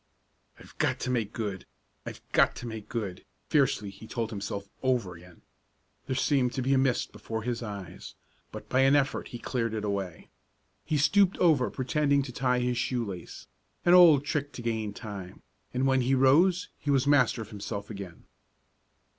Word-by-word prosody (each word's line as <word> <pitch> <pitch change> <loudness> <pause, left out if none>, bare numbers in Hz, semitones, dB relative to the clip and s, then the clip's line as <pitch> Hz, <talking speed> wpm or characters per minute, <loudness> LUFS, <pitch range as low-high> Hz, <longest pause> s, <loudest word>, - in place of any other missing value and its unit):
"I've - - -16
got - - +1
to 125 - -1
make 115 -4 -1
good! 105 -6 -5 0.4
I've - - -7
got - - +4
to - - -7
make 110 -3 -7
good!" 100 -6 -4 0.3
fiercely 135 -9 +2
he 110 +3 -13
told 115 -1 -3
himself 100 -1 -5
over 125 -8 0
again. 90 0 -16 0.6
There 130 - -1
seemed 130 -2 +1
to 130 - -2
be 135 +2 +2
a - - +4
mist 130 -2 +1
before 110 -1 -5
his 120 0 -2
eyes, 100 -6 -8 0.4
but - - -9
by 130 - +1
an 135 +1 +5
effort 140 -1 0
he 120 - -7
cleared 115 -2 -2
it 105 -1 -3
away. 100 -4 -4 0.5
He 155 - -1
stooped 195 +6 +3
over 155 -8 +3
pretending 140 +1 +1
to 130 - -7
tie 125 0 0
his 125 -1 0
shoe 125 -1 -1
lace 90 -4 -8 0.4
an 175 - +6
old 165 -6 +7
trick 145 -1 -2
to 120 - -8
gain 110 -2 -2
time 100 -4 -9 0.3
and 130 +1 0
when 130 -1 +3
he 130 +2 +2
rose 165 +8 +4
he 145 - -5
was 135 -1 +3
master 130 -5 +3
of 110 - -15
himself 100 0 -6
again. 100 -4 -9
125 Hz, 180 wpm, -28 LUFS, 105-135 Hz, 0.6 s, old